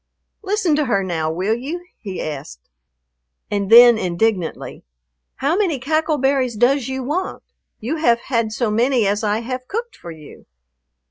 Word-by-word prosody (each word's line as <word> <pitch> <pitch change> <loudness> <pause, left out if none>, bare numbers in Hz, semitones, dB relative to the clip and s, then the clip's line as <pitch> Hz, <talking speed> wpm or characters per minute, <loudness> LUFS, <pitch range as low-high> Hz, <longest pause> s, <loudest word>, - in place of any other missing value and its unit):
"Listen 390 -6 0
to 300 - +1
her 200 -6 +1
now, 160 -4 -2
will 185 +6 -1
you?" 300 +10 -5
he 195 -5 -6
asked. 65 - -7 0.8
And 200 -1 -1
then 235 0 +8
indignantly, 180 -1 -2 0.5
"How 285 +5 0
many 370 -7 +1
cackle 310 +4 0
berries 265 -3 +1
does 245 +3 +2
you 265 0 -4
want? 320 +9 -3 0.4
You 265 +9 -3
haf 235 -7 +3
had 230 -4 -1
so 220 0 -1
many 240 +1 +2
as 205 +2 0
I 210 +1 0
haf 255 +1 -5
cooked 470 +2 -5
for 170 - -11
you." 155 -3 -13
240 Hz, 155 wpm, -20 LUFS, 205-285 Hz, 0.8 s, then